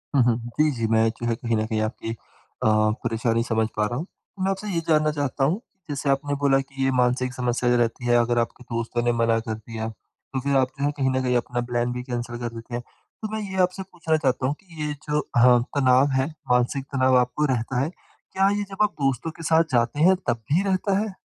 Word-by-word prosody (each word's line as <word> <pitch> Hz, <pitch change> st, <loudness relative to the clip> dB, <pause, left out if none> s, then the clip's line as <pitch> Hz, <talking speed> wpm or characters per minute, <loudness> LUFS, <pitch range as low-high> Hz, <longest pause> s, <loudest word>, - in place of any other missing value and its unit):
हुँ, 135 Hz, -, +6 dB
हुँ। 120 Hz, -1 st, +3 dB, 0.2 s
जी, 155 Hz, 0 st, +5 dB
जी 115 Hz, -4 st, -2 dB
मैं 110 Hz, 0 st, +4 dB
जो 120 Hz, -, -5 dB
है 115 Hz, -, +1 dB
कहीं 115 Hz, 0 st, -1 dB
न 110 Hz, -, 0 dB
कहीं 110 Hz, -1 st, -1 dB
आपकी 110 Hz, +1 st, -3 dB
अ, 115 Hz, -, -11 dB
परेशानी 115 Hz, +2 st, +1 dB
समझ 110 Hz, -2 st, +1 dB
पा 105 Hz, -, +1 dB
रहा 120 Hz, -, -3 dB
हूँ। 155 Hz, -, -3 dB
तो 190 Hz, 0 st, -11 dB
मैं 190 Hz, -, +2 dB
आपसे 195 Hz, +2 st, -4 dB
ये 175 Hz, -4 st, 0 dB
जानना 155 Hz, -1 st, +3 dB
चाहता 145 Hz, -2 st, -1 dB
हूँ, 155 Hz, +8 st, +2 dB
कि 195 Hz, -5 st, -39 dB
जैसे 140 Hz, 0 st, -2 dB
आपने 140 Hz, +1 st, +1 dB
बोला 140 Hz, -1 st, +4 dB
कि 135 Hz, 0 st, -5 dB
ये 135 Hz, -, +3 dB
मानसिक 125 Hz, 0 st, +1 dB
समस्या 125 Hz, -1 st, 0 dB
जो 125 Hz, -, +4 dB
रहती 120 Hz, +1 st, 0 dB
है, 120 Hz, 0 st, +3 dB
अगर 120 Hz, 0 st, +1 dB
आपके 120 Hz, +2 st, -3 dB
दोस्तों 115 Hz, 0 st, -2 dB
ने 120 Hz, -, +3 dB
मना 115 Hz, 0 st, +3 dB
कर 110 Hz, 0 st, -4 dB
दिया, 110 Hz, 0 st, -6 dB
तो 130 Hz, +4 st, -9 dB
फिर 140 Hz, +2 st, 0 dB
आप 130 Hz, -1 st, +3 dB
जो 140 Hz, -, +1 dB
है, 145 Hz, -, +2 dB
कहीं 135 Hz, -2 st, +2 dB
न 130 Hz, 0 st, 0 dB
कहीं 125 Hz, -1 st, +1 dB
अपना 120 Hz, 0 st, -2 dB
प्लान 120 Hz, 0 st, 0 dB
भी 125 Hz, 0 st, -4 dB
कैंसल 120 Hz, -1 st, -4 dB
कर 120 Hz, 0 st, -3 dB
देते 115 Hz, +1 st, -7 dB
हैं। 120 Hz, -, -3 dB, 0.4 s
तो 215 Hz, -, -2 dB
मैं -, -, -2 dB
ये -, -, -5 dB
आपसे 185 Hz, +1 st, 0 dB
पूछना 160 Hz, -3 st, -1 dB
चाहता 130 Hz, -3 st, 0 dB
हूँ 140 Hz, -, 0 dB
कि 170 Hz, -6 st, -8 dB
ये 150 Hz, 0 st, -1 dB, 0.2 s
जो 150 Hz, 0 st, +2 dB
अ, 135 Hz, -, -1 dB, 0.4 s
तनाव 130 Hz, +1 st, +4 dB
है, 130 Hz, -, +1 dB, 0.2 s
मानसिक 125 Hz, +2 st, +2 dB
तनाव 130 Hz, -1 st, +4 dB
आपको 125 Hz, +4 st, +1 dB
रहता 125 Hz, +1 st, -1 dB
है, 140 Hz, -, 0 dB
क्या 190 Hz, +2 st, -2 dB
ये 205 Hz, -, -1 dB
जब 195 Hz, +2 st, 0 dB
आप 210 Hz, -, +2 dB
दोस्तों 135 Hz, +3 st, 0 dB
के -, -, -7 dB
साथ 165 Hz, 0 st, +4 dB
जाते 120 Hz, +3 st, +1 dB
हैं 190 Hz, -, +5 dB
तब 115 Hz, -1 st, 0 dB
भी 175 Hz, +6 st, +3 dB
रहता 195 Hz, 0 st, +1 dB
है? 215 Hz, -2 st, -3 dB
130 Hz, 250 wpm, -24 LUFS, 120-150 Hz, 0.4 s, हुँ